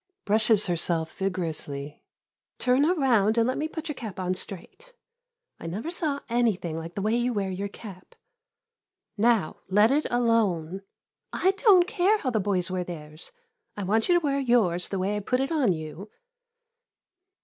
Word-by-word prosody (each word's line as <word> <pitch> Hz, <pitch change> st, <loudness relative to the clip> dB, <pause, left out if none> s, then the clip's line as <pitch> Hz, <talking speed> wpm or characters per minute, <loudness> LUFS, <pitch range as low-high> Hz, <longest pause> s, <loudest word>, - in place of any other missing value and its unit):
[Brushes 215 Hz, 0 st, +3 dB
herself 165 Hz, -2 st, -1 dB
vigorously.] 155 Hz, -6 st, -4 dB, 0.6 s
Turn 255 Hz, +3 st, +3 dB
around 240 Hz, -, +2 dB
and 230 Hz, 0 st, +3 dB
let 255 Hz, -, -1 dB
me 310 Hz, -, -1 dB
put 320 Hz, 0 st, -7 dB
your 300 Hz, -, -2 dB
cap 215 Hz, -8 st, -8 dB
on 185 Hz, 0 st, -1 dB
straight. 205 Hz, -, -8 dB, 0.7 s
I -, -, -7 dB
never 215 Hz, -, -4 dB
saw 300 Hz, -5 st, -2 dB
anything 225 Hz, -9 st, 0 dB
like 165 Hz, +2 st, -7 dB
the 200 Hz, -, -3 dB
way 215 Hz, +2 st, +1 dB
you 240 Hz, +1 st, 0 dB
wear 195 Hz, -3 st, -2 dB
your 195 Hz, +2 st, -3 dB
cap. 195 Hz, -2 st, -12 dB, 1.0 s
Now, 220 Hz, -5 st, +2 dB
let 210 Hz, +5 st, +4 dB
it 295 Hz, +2 st, +1 dB
alone. 205 Hz, -8 st, +1 dB, 0.5 s
I 380 Hz, -, +2 dB
don't 390 Hz, -3 st, +5 dB
care 375 Hz, +4 st, +2 dB
how 265 Hz, -11 st, -2 dB
the 220 Hz, -, +1 dB
boys 190 Hz, -3 st, -1 dB
wear 185 Hz, -1 st, -1 dB
theirs 155 Hz, -2 st, -9 dB, 0.2 s
— 455 Hz, -, -45 dB
I 205 Hz, -, -3 dB
want 220 Hz, -, +1 dB
you 355 Hz, -, +5 dB
to 330 Hz, -, -5 dB
wear 280 Hz, -1 st, +1 dB
yours 220 Hz, -10 st, +2 dB
the 195 Hz, -, -2 dB
way 190 Hz, +3 st, -1 dB
I -, -, -1 dB
put 250 Hz, +5 st, -1 dB
it 270 Hz, +3 st, -1 dB
on 285 Hz, -, +2 dB
you. 160 Hz, +5 st, -6 dB
210 Hz, 170 wpm, -26 LUFS, 180-255 Hz, 1.0 s, don't